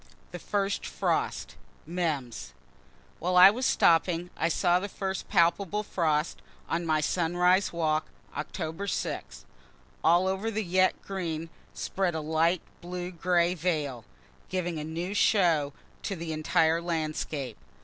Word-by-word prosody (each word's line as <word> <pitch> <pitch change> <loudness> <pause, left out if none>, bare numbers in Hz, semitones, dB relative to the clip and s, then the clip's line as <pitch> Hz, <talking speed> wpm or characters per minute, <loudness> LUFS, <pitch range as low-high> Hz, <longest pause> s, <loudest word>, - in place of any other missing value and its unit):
THE 175 - -6
FIRST 200 +2 -1
FROST - - -2 0.3
MEMS 155 -8 -3 0.7
Where 180 +2 0
I 185 +2 +10
was 255 +4 -1
stopping 170 +1 +3
I 165 - 0
saw 175 +1 +3
the 200 +2 -5
first 190 -1 -4
palpable 190 +4 +2
frost, 160 -5 0 0.3
on 170 0 -1
my 155 -1 +2
sunrise 180 +4 +2
walk, 155 -2 0 0.3
October 165 +3 -4
6; 65 - -4 0.6
all 175 +3 +5
over 190 +4 -1
the 220 0 -2
yet 185 +1 +2
green 165 -4 -4 0.2
spread 185 -3 -1
a - - -1
light 160 +3 +1 0.2
blue 180 +1 -5
gray 175 0 +2
veil, 150 -8 -2 0.5
giving 175 -3 -2
a - - -4
new 165 +5 -4
show 170 -9 +3 0.3
to 195 - -3
the 165 -2 -4
entire 160 +1 +2
landscape. 155 -6 -3
170 Hz, 130 wpm, -28 LUFS, 160-185 Hz, 0.7 s, I